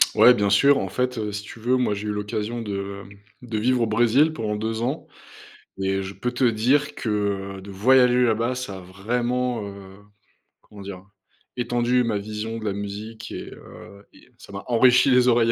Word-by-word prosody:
Ouais 125 0 +7
bien 100 -3 +1
sûr, 140 +7 +5
en 95 - -2
fait, 125 +4 -2
heu, 105 -1 -3
si 105 +1 -4
tu 110 +2 -11
veux, 125 +3 +1
moi 125 -5 +1
j'ai 105 +1 -5
eu - - -1
l'occasion 105 +3 -3
de 100 -1 -5
hem 100 +1 -14 0.2
de 120 -3 -4
vivre 125 +3 +1
au 115 - +2
Brésil 120 +8 +3
pendant 110 -8 -3
2 110 +2 -3
ans 135 +6 -3 0.7
et 95 0 0
je 95 +1 -7
peux 120 +6 -3
te 125 +1 -4
dire 125 +6 +2
que, 100 -3 -2
heu, - - -9
de 100 - -10
voyager 125 +4 +4
là-bas 115 +2 +1
ça 100 -7 -5
a - - -9
vraiment, 120 +6 -2
heu, 100 -1 -10 0.6
comment 105 -1 -14
dire? 95 -1 -8 0.5
Étendu 120 0 +1
ma 110 -3 0
vision 110 +2 -5
de 110 - -7
la 105 - -1
musique 100 +3 -7
et - - -7
heu 100 0 -13
et - - -20
ça - - -14
m'a 100 - -6
enrichi 125 +2 +5
les 125 0 +5
oreilles 115 -1 +4
110 Hz, 200 wpm, -23 LUFS, 100-125 Hz, 0.7 s, Ouais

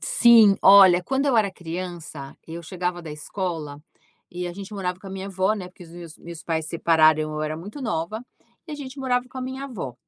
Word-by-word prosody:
Sim. 225 -4 +6
Olha, 190 -2 +8
quando 270 +8 -1
eu 265 -4 +2
era 210 -3 +3
criança, 170 -5 -7
e 160 - -8
eu 170 - -7
chegava 180 0 -4
da 160 - -8
escola, 150 -1 -5 0.5
e 180 0 -5
a 175 - -5
gente 195 +3 -9
morava 180 -2 -3
com - - -12
a - - -7
minha 190 0 -6
avó, 190 +1 0
né 190 -4 -7
porque 180 0 -15
os 165 - -16
meus 170 -2 -11
meus 170 -1 -10
pais 160 -2 -2
separaram 155 -2 +3
eu 155 0 -4
era 155 0 -3
muito 205 - -9
nova, 215 0 -3 0.4
e 315 - -8
a - - -3
gente 280 -1 -9
morava 250 -2 0
com 260 - -9
a - - -4
minha 260 +2 -5
avó. 195 - -6
180 Hz, 225 wpm, -23 LUFS, 165-215 Hz, 0.5 s, Olha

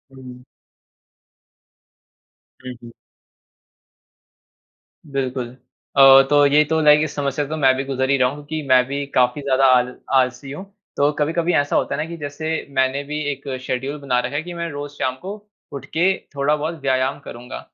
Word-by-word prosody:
हुँ। 125 -1 -12 2.2
हुँ, 125 - -6
हुँ। 120 - -11 2.2
बिल्कुल। 130 -3 -3 0.5
अ, 135 0 +9
तो 145 -1 +5
ये 145 +2 +5
तो 160 0 +1
लाइक 150 0 +6
इस 155 - -4
समस्या 140 0 -1
से - - -12
तो 155 - -3
मैं 135 -3 +4
भी 135 - -2
गुज़र 130 -1 -2
ही 140 - +3
रहा 125 -1 +3
हूँ, 140 - -7
क्योंकि 155 +2 -5
मैं 130 -1 +6
भी 140 +1 -4
काफ़ी 125 +3 +2
ज़्यादा 135 -1 +2
आल 125 -1 +3 0.2
आलसी 130 +1 +1
हूँ। 170 +7 -7 0.3
तो 145 +1 +3
कभी-कभी 165 +3 0
ऐसा 145 0 +1
होता - - 0
है 150 - -2
ना 160 - -4
कि 170 - -7
जैसे, 155 +2 -4
मैंने 130 +1 0
भी 150 +1 -5
एक 140 +1 -9
शेड्यूल 135 +3 -3
बना 125 -3 0
रखा 125 +3 -4
है 150 - 0
कि 175 0 -8
मैं 170 0 -4
रोज़ 145 0 -6
शाम 130 -2 -2
को 195 +2 -6 0.4
उठ 140 - -7
के 185 +4 +3 0.2
थोड़ा-बहुत 150 +3 -1
व्यायाम 130 +1 0
करूँगा। 125 -2 -9
140 Hz, 175 wpm, -20 LUFS, 130-150 Hz, 2.2 s, अ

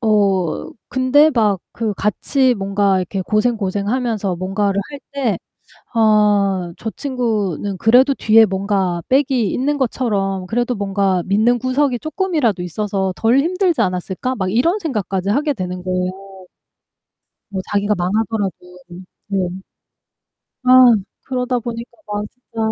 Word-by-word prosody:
어 200 -6 +1 0.2
근데 265 +4 +4
막 215 -7 +2 0.2
그 225 -2 -1
같이 250 +6 +1
뭔가 195 -1 +1
이렇게 185 +1 -3
고생고생하면서 215 -1 -1
뭔가를 195 +2 -1
할 285 -1 -8
때 265 -7 -1 0.6
'아 205 -5 +2
저 220 - -4
친구는 215 - -2
그래도 250 +7 +5
뒤에 225 -3 +5
뭔가 190 -3 -1
백이 260 -6 +2
있는 285 +3 0
것처럼 200 -7 -1
그래도 240 +4 -1
뭔가 195 -3 0
믿는 220 +5 +2
구석이 255 0 0
쪼끔이라도 310 - -1
있어서 190 +1 -2
덜 230 +6 +3
힘들지 355 +1 +1
않았을까?' 190 +6 -2
막 185 -2 -2
이런 330 - +2
생각까지 200 - -2
하게 290 +7 +1
되는 180 -4 -5
거예요. 185 0 -1 1.4
뭐 195 -2 -3
자기가 205 +1 +1
망하더라도 200 +2 -1 0.8
네. 195 -3 0 1.2
아 255 -1 +8 0.3
그러다 250 -1 -1
보니까 235 0 -6 0.2
막 210 0 -3
진짜 250 -2 -16
215 Hz, 270 characters per minute, -19 LUFS, 195-250 Hz, 1.4 s, 아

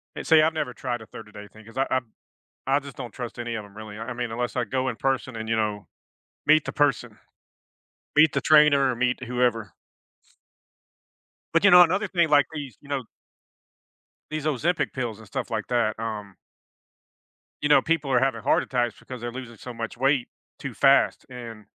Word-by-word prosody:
And - - -6
see, 160 -1 +7
I've 160 +1 +2
never 125 -5 -3
tried 120 -1 -4
a - - -10
30 105 -1 -12
day 105 0 -10
thing 110 +1 -16
because 115 +3 -14
I 135 - +1
I 130 - +2 0.8
I - - +3
just 140 -2 -12
don't 120 -3 -7
trust 120 -1 -7
any 120 -1 -4
of 110 -2 -5
'em, 105 +1 -17
really. 110 -1 -9
I 120 +2 -5
mean, 120 -1 -4
unless 120 +2 -3
I 125 - +1
go 130 +3 -2
in 120 - -4
person 130 -1 -1
and, 110 0 -5
you 115 - +1
know, 105 -2 -2 0.6
meet 155 0 +5
the - - -4
person. 145 -1 0 1.0
Meet 150 0 +6
the 140 - 0
trainer 150 -3 +5
or - - -3
meet 125 +1 0
whoever. 120 -4 0 1.8
But 165 +3 +3
you 200 - +7
know, 180 0 +9
another 185 +5 0
thing, 170 -4 +1
like, 145 -3 +5
these, 140 -7 -6
you 145 - -17
know 140 -2 -2 1.3
these 155 -1 -4
Ozempic 155 +4 0
pills 120 -5 -4
and 110 - -14
stuff 130 +4 -5
like 110 -2 -2
that, 115 -3 0
um 105 -4 -5 1.3
You 145 - 0
know, 150 - +7
people 155 -4 0
are 125 - +4
having 135 +1 0
heart - - +2
attacks 120 -3 -1
because 130 -2 -9
they're 120 0 -4
losing 120 -2 -9
so 125 +4 -8
much 115 0 -6
weight 135 -1 +2 0.3
too - - -6
fast - - +3
and 115 -4 -9
125 Hz, 200 wpm, -25 LUFS, 115-145 Hz, 1.8 s, know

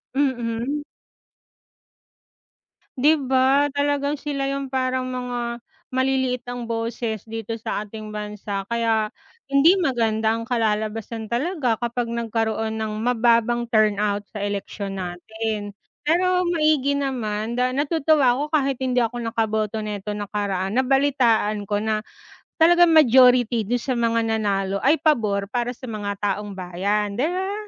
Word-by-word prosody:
mm. 260 +1 -1 2.1
'Di 305 +4 +4
ba, 265 +2 +4
talagang 285 0 0
sila 280 -2 -3
'yung 275 -1 -3
parang 255 -1 0
mga 245 -1 -3 0.3
maliliit 260 -1 0
ang 245 0 -5
boses 230 -1 -3
dito 225 0 -5
sa 215 - -3
ating 215 0 -8
bansa 210 -1 -4
kaya 225 -2 +1 0.4
hindi 285 +7 +6
maganda 225 -7 +1
ang 230 - -3
kalalabasan 220 -1 -1
talaga 260 -1 0
kapag 240 0 -2
nagkaroon 225 -1 -1
ng 220 -1 -2
mababang 240 0 +2
turnout 210 -2 +2
sa 210 -2 -6
eleksyon 200 -1 -4
natin, 205 +4 -4 0.4
pero 365 +3 +3
maigi 305 -4 +2
naman 230 -5 -2
da 250 0 +2
natutuwa 290 -3 +3
ako 290 - 0
kahit 275 -3 +1
hindi 255 -1 +1
ako 240 +1 -2
nakaboto 220 -1 -1
neto 210 -1 -5
nakaraan 200 -1 -2
nabalitaan 250 -6 +2
ko 205 0 0
na 215 -1 0 0.6
talagang 345 +1 +6
majority 250 -5 +5
dun 245 +2 0
sa 255 +2 -2
mga 230 -1 +1
nanalo 200 -2 0
ay 295 +4 +4
pabor 220 - +1
para 240 +1 -1
sa 255 - -10
mga 205 -2 -3
taong 205 0 -2
bayan. 200 +3 -1
Di 270 - +2
ba? 380 +3 -2
235 Hz, 130 wpm, -23 LUFS, 215-270 Hz, 2.1 s, hindi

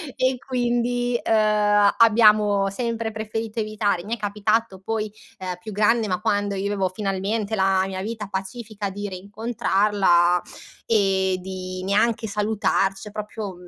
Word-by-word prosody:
e 255 0 +1
quindi, 245 -1 -1
uhm, 210 -2 +3
abbiamo 210 -3 +5
sempre 230 +1 -3
preferito 220 +1 -4
evitare. 210 -4 -1
Mi 230 - -2
è - - -14
capitato 210 0 -1
poi, 215 +1 -3 0.3
uhm, 185 -1 -4
più 215 +2 -8
grande 215 +2 +2
ma 185 +2 -2
quando 205 -2 0
io 195 +1 -2
avevo 195 -2 0
finalmente 200 +3 -2
la 190 -1 +2
mia 190 -1 -4
vita 215 0 -5
pacifica 200 +1 -5
di 205 +1 -5
reincontrarla 200 -3 +1 0.4
e 190 -4 +2
di 185 0 -6
neanche 220 +3 +1
salutarci, 205 -1 0
cioè 210 - -9
proprio 210 -1 -6
210 Hz, 135 wpm, -23 LUFS, 195-225 Hz, 0.4 s, abbiamo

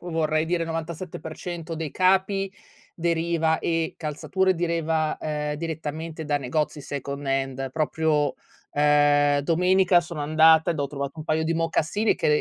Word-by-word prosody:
vorrei 160 -2 0
dire 170 0 0
97% 165 0 -6
dei 155 -3 -4
capi 190 +1 +2 0.4
deriva 165 -1 +1
e 165 -1 -1
calzature 185 +5 0
deriva, 165 -2 0
ehm, 150 -1 -2
direttamente 160 0 -5
da 145 -1 0
negozi 145 +3 -2
second 140 0 -5
hand. 135 0 -1
Proprio, 155 0 0 0.4
uhm 145 0 +4 0.3
domenica 180 +3 +4
sono 170 -2 -7
andata 160 +2 +5
ed 160 - -4
ho 140 - -1
trovato 140 -1 -4
un 155 - -7
paio 160 0 0
di 165 +1 0
mocassini 165 +6 +1
che - - -1
160 Hz, 135 wpm, -25 LUFS, 150-170 Hz, 0.4 s, andata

